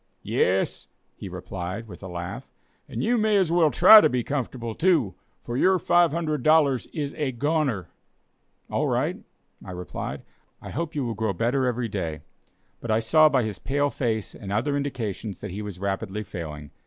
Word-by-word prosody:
"Yes," 95 +1 0 0.3
he - - -8
replied, 95 +5 -6
with 90 -5 -11
a 95 - -7
laugh; 90 +8 -6 0.4
"and - - -3
you 240 +1 +2
may 215 -1 +3
as 185 -4 +2
well 170 -2 +4
try 210 +8 +9
to - - +4
be 125 -1 -1
comfortable, 125 -4 -3
too, 155 - +2 0.3
for 120 - -5
your 185 +8 +4
$500 155 -5 +2
is 145 -3 -3
a 145 -4 -2
goner." 135 - 0 0.8
"All - - 0
right," - - 0 0.5
I - - -10
replied, 90 0 -6 0.4
"I - - -9
hope 160 +2 -4
you 140 -3 -1
will 115 - -2
grow 110 -1 -1
better 125 +6 +1
every 120 -1 -1
day." 80 -7 -4 0.6
But 120 - -8
I 110 0 +3
saw 155 +7 +5
by 135 -4 +2
his 105 -4 -4
pale 145 +6 0
face 110 -5 -2
and 100 - -8
other 120 +8 0
indications 115 -8 -4
that - - -6
he 100 +3 -5
was 105 -3 -6
rapidly 100 +2 -3
failing. 75 -6 -7
120 Hz, 175 wpm, -25 LUFS, 100-150 Hz, 0.8 s, try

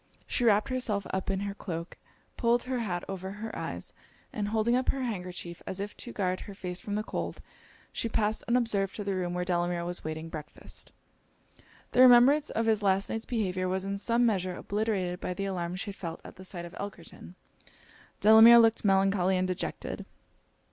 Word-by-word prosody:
She 245 - -1
wrapped 210 0 +4
herself 230 -6 -1
up 190 0 -2
in 195 0 0
her 200 0 -3
cloak, 170 -4 -6 0.4
pulled 235 0 +2
her 255 -1 -2
hat 180 -6 -2
over 190 0 -5
her 220 +2 -6
eyes, - - -5 0.4
and 210 -2 -2
holding 220 +3 +2
up 255 0 0
her 270 - 0
handkerchief 180 -6 -5
as 190 - -4
if 205 +1 -5
to 240 - -6
guard 185 -3 -1
her 200 - -9
face 180 -2 -4
from 205 +2 -4
the 210 - -1
cold, - - -4 0.5
she 230 - -1
passed 215 -1 0
unobserved 225 -5 +1
to 210 - -4
the 200 -1 -1
room 180 -1 -2
where 180 0 -1
Delamere 175 -1 0
was 175 0 -3
waiting 155 +1 -5
breakfast. 155 -2 -6 1.0
The 250 - +4
remembrance 255 +4 +7
of 225 - -1
his 220 -1 +2
last 195 0 +2
night's 225 0 -3
behaviour 185 -6 -1
was 190 +1 -1
in 200 0 -2
some 235 +3 +2
measure 185 -5 0
obliterated 200 -4 -2
by 180 - -4
the 195 - -3
alarm 180 -2 -3
she 195 +2 -4
had - - -13
felt 165 -4 -6
at - - -11
the 185 - -12
sight 175 -2 -7
of 170 - -10
Elkerton. 185 -2 -9 0.9
Delamere 220 +2 +9
looked 225 -1 +5
melancholy 195 -2 +3
and 185 0 +1
dejected. 185 -1 -4
195 Hz, 190 wpm, -29 LUFS, 180-225 Hz, 1.0 s, Delamere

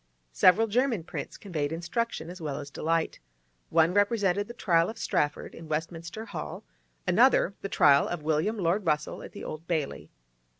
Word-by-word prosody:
Several 185 - +5
German 230 -3 +1
prints - - -6
conveyed 155 -7 -3
instruction 175 +1 -3
as 180 -1 -10
well 150 -3 -3
as 145 -1 -7
delight; 165 +2 -1 0.5
one 165 +2 +4
represented 205 -1 +2
the 235 - -8
trial 170 -6 +2
of 225 - -7
Strafford 150 -6 -1
in 165 -1 -11
Westminster 165 +6 -4
Hall; - - -6 0.4
another, 195 - +4
the 200 - -4
trial 140 -5 +5
of 175 -3 -4
William 160 +8 +1
Lord 190 +2 +1
Russell, 150 -1 0
at - - -10
the - - -8
Old 160 +2 -7
Bailey. 155 -5 -2
170 Hz, 165 wpm, -28 LUFS, 155-205 Hz, 0.5 s, Several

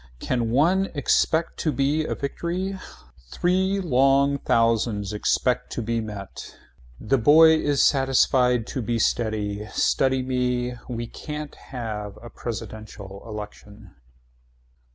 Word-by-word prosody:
Can 120 - -1
one 175 +10 +3
expect 160 +3 +1
to 155 - 0
be 145 +3 0
a - - -2
victory. 175 +7 -3 0.6
Three 190 - +1
long 140 -3 +3
thousands. 115 -4 +1
Expect 125 +4 0
to 120 - -3
be 115 +1 -1
met. 105 -3 -8 0.4
The 130 +5 +1
boy 155 +7 +7
is 145 -2 +1
satisfied 130 -3 +3
to 130 - -4
be 115 +1 -1
steady. 105 -2 -1
Study 130 +3 +1
me. 125 -1 -1 0.2
Why 120 -1 -4
can't 150 +4 -7
we - - -18
have 105 -5 -5
a 120 - -11
presidential 105 -3 -7
election. 105 -2 -10
125 Hz, 120 wpm, -24 LUFS, 110-140 Hz, 0.6 s, boy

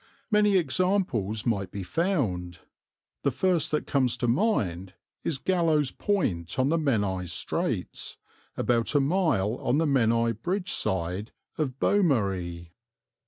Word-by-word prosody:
Many 210 -2 +4
examples 150 - 0
might 100 -6 0
be 100 +1 -6
found; 95 - -1 0.6
the - - +2
first 170 +5 +1
that 150 - -1
comes 130 -3 +1
to 120 - -1
mind 100 - 0 0.3
is 155 - -1
Gallows 160 -4 +1
Point 90 - -1
on 130 +1 +2
the 165 +1 +2
Menai 100 - 0
Straits, 85 - -3 0.4
about 120 +3 +1
a - - +6
mile 135 - +1
on 130 - 0
the 165 - +2
Menai 115 -4 +2
Bridge 185 - -1
side 95 +3 -1 0.2
of 135 -5 -2
Beaumari. 95 - +1
130 Hz, 125 wpm, -27 LUFS, -, 0.6 s, a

